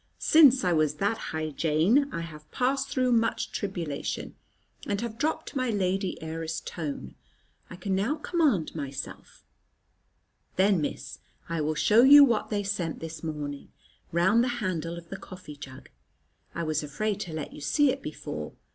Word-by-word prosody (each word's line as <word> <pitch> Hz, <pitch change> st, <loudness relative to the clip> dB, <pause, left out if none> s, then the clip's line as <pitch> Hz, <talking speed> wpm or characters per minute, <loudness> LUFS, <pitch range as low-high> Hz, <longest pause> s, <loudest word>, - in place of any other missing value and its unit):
Since 280 Hz, -6 st, +6 dB
I 180 Hz, -1 st, +2 dB
was 155 Hz, -2 st, +2 dB
that 200 Hz, +8 st, 0 dB
high, 155 Hz, -1 st, -3 dB
Jane, 170 Hz, -, +2 dB
I 170 Hz, -, -3 dB
have 155 Hz, -2 st, -10 dB
passed 270 Hz, +2 st, 0 dB
through 255 Hz, -3 st, +1 dB
much 230 Hz, -1 st, +1 dB
tribulation, 175 Hz, -8 st, -4 dB, 0.5 s
and 200 Hz, -1 st, -1 dB
have 230 Hz, 0 st, -5 dB
dropped 315 Hz, +1 st, -2 dB
my 255 Hz, -2 st, 0 dB
lady 195 Hz, -2 st, -1 dB
heiress 160 Hz, 0 st, -4 dB
tone. 145 Hz, -, -6 dB, 0.6 s
I -, -, -8 dB
can 190 Hz, +1 st, -3 dB
now 205 Hz, +10 st, +1 dB
command 300 Hz, -, +1 dB
myself." 140 Hz, -3 st, -7 dB, 1.1 s
"Then, 190 Hz, -2 st, +3 dB
Miss, 145 Hz, -, -5 dB, 0.3 s
I 165 Hz, -1 st, -1 dB
will 155 Hz, +1 st, 0 dB
show 215 Hz, +8 st, +5 dB
you 285 Hz, +3 st, +10 dB
what 235 Hz, -6 st, +2 dB
they 205 Hz, -1 st, -1 dB
sent 195 Hz, -5 st, -2 dB
this 165 Hz, 0 st, -7 dB
morning, 145 Hz, -3 st, -5 dB, 0.4 s
round 190 Hz, +8 st, +4 dB
the -, -, +1 dB
handle 170 Hz, -5 st, -2 dB
of 170 Hz, -1 st, -11 dB
the -, -, -5 dB
coffee 180 Hz, -5 st, -10 dB
jug. 130 Hz, -2 st, -11 dB, 0.7 s
I 170 Hz, -, -2 dB
was 155 Hz, -2 st, 0 dB
afraid 205 Hz, +8 st, -2 dB
to 175 Hz, -5 st, -5 dB
let 155 Hz, -1 st, -5 dB
you -, -, -10 dB
see 275 Hz, -, +3 dB
it -, -, -5 dB
before." -, -, -6 dB
185 Hz, 165 wpm, -28 LUFS, 155-230 Hz, 1.1 s, you